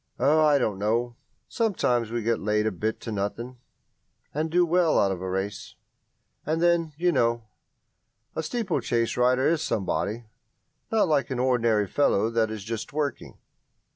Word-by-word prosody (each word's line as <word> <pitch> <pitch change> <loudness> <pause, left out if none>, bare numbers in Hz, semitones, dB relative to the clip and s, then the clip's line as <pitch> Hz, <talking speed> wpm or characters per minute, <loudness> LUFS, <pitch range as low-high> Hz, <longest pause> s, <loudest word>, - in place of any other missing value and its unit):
"Oh, 150 +5 +4
I 150 -2 +5
don't 105 -7 -1
know 120 +3 0 0.3
sometimes 125 - 0
we 120 0 -3
get 115 0 +1
laid 105 +1 0
a 110 - +1
bit 110 +4 -3
to 115 - -6
nothing, 115 +5 -4 0.8
and 155 +2 -1
do 175 +2 +3
well 170 -1 +2
out 100 - +3
of 90 -2 -4
a 95 - -4
race. 95 +2 -4 0.7
And 160 +2 -1
then, 170 -2 +2
you 175 +2 +2
know, 115 -5 +1 0.9
a 160 - -1
steeplechase 155 - -1
rider 125 +2 +3
is 165 -1 +1
somebody 110 -1 -2 0.7
not 220 -3 +3
like 150 -3 +1
an 130 - -3
ordinary 120 -4 +2
fellow 110 -1 +1
that 115 -1 +1
is 110 -2 -6
just 115 +1 -5
working." 145 -1 -3
120 Hz, 160 wpm, -26 LUFS, 110-155 Hz, 0.9 s, I